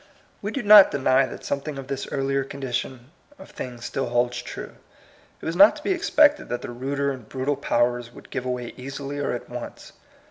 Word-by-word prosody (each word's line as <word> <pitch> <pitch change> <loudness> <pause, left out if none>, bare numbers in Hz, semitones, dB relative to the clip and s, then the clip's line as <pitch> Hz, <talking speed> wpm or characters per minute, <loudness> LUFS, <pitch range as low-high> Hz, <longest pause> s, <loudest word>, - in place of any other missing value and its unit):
We 205 - -3
do 255 +3 -3
not 210 -1 +9
deny 135 -1 +2
that - - -9
something 140 +1 -3
of 135 - -6
this 135 0 -4
earlier 135 0 0
condition 130 -1 -5 0.3
of 190 - -13
things 120 -2 -7
still 135 -2 -2
holds 120 0 0
true. - - -8 0.6
It - - -11
was 165 - -2
not 200 +4 +7
to 300 - -11
be - - 0
expected 300 -4 +3
that 120 - -3
the - - -5
ruder 140 +3 -2
and 125 -5 -9
brutal 135 +2 -1
powers 120 -1 0
would - - -15
give 130 -1 -3
way 125 -1 -4
easily 135 +2 -6
or 145 - -1
at 120 - -6
once. 120 0 -8
135 Hz, 200 wpm, -24 LUFS, 125-145 Hz, 0.6 s, not